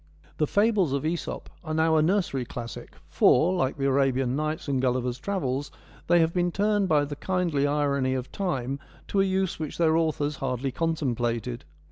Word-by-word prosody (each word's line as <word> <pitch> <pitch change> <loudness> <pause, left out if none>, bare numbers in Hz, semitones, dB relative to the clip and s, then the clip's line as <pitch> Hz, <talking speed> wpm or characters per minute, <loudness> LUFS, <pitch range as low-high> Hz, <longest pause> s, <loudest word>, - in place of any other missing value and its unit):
The 150 - +1
fables 205 -7 +2
of 140 - -1
Mso 165 +2 -3
p - - -18
are 155 -2 -3
now 160 0 +3
a 155 - +5
nursery 165 -6 +1
classic, 120 -1 -8
for, 165 +8 +4
like 135 -7 0
the 135 - -1
Arabian 135 -2 +2
Nights 155 +2 -2
and 135 -2 0
Gulliver's 125 -1 0
Travels, 145 -8 -2 0.4
they 175 - +5
have 165 0 +1
been 175 -1 +1
turned 205 0 +1
by 150 -2 +3
the 145 0 -6
kindly 165 -3 0
irony 140 -3 +1
of 130 0 -4
time 140 -8 -2 0.3
to 195 - +2
a - - +4
use 190 -2 0
which 155 -2 -5
their 160 -2 +3
authors 150 -3 0
hardly 130 0 -2
contemplated. 120 - -2
150 Hz, 180 wpm, -26 LUFS, 130-170 Hz, 0.4 s, a